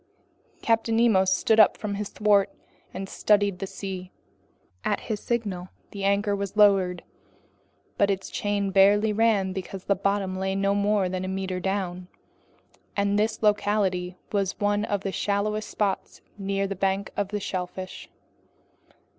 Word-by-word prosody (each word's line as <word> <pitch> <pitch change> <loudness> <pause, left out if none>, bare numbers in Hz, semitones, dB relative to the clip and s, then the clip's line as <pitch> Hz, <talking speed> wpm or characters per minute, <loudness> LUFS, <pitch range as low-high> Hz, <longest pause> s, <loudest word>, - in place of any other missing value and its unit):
Captain 225 0 +2
Nemo 220 -5 +4
stood 205 +4 +2
up 215 - +6
from 210 -1 -4
his 200 0 -4
thwart 205 -2 +3 0.4
and 190 +1 -5
studied 205 -2 +2
the 195 - -3
sea. 185 -2 -6 0.7
At - - 0
his 215 -3 -3
signal 205 -7 -2 0.2
the 200 -1 -6
anchor 200 +1 +2
was 200 +1 -5
lowered, 195 -4 +4 1.0
but 200 - +4
its 195 -1 -2
chain 200 -1 -1
barely 205 +2 +5
ran 205 -4 +2
because 190 0 -6
the 200 - +2
bottom 195 -1 -1
lay 190 0 -1
no 195 0 +1
more 205 -1 +2
than 185 0 -3
a - - -3
meter 190 -1 -3
down, 185 -1 -3 0.9
and 200 0 +2
this 220 +1 -1
locality 200 -4 +1
was 195 -2 -1
one 205 +1 +1
of 205 -3 -1
the 195 - -3
shallowest 210 +2 -1
spots 200 -2 -2
near 195 -1 -1
the 195 0 -3
bank 195 +1 -1
of 200 -1 -1
shellfish. 185 -1 -5
200 Hz, 145 wpm, -26 LUFS, 190-205 Hz, 1.0 s, up